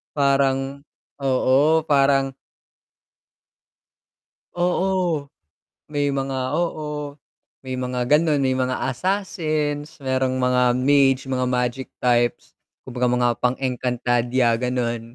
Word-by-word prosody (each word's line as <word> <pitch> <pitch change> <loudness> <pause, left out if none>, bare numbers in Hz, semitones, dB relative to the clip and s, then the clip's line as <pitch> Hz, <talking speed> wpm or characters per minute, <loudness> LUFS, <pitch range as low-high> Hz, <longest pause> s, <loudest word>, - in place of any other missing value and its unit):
Parang, 135 -1 +1 0.4
oo, 135 +4 +3
parang 135 -2 +2 2.2
Oo, 180 -3 0 0.6
may 145 -1 -1
mga 135 0 -2
oo, 150 -4 -3 0.5
may 130 -1 -5
mga 125 -1 -3
gano'n 150 -1 +3
may 130 -1 +1
mga 130 +1 -1
assassins, 155 -2 -2
merong 130 -1 0
mga 125 -1 +3
mage 135 +1 +3
mga 130 -1 0
magic 125 +1 -2
types, 120 -1 0 0.2
kung 130 -1 -10
baga 125 - +2
mga 125 0 +2
pang-Encantadia, 125 -1 0
gano'n. 120 -1 -2
135 Hz, 95 wpm, -22 LUFS, 125-145 Hz, 2.2 s, oo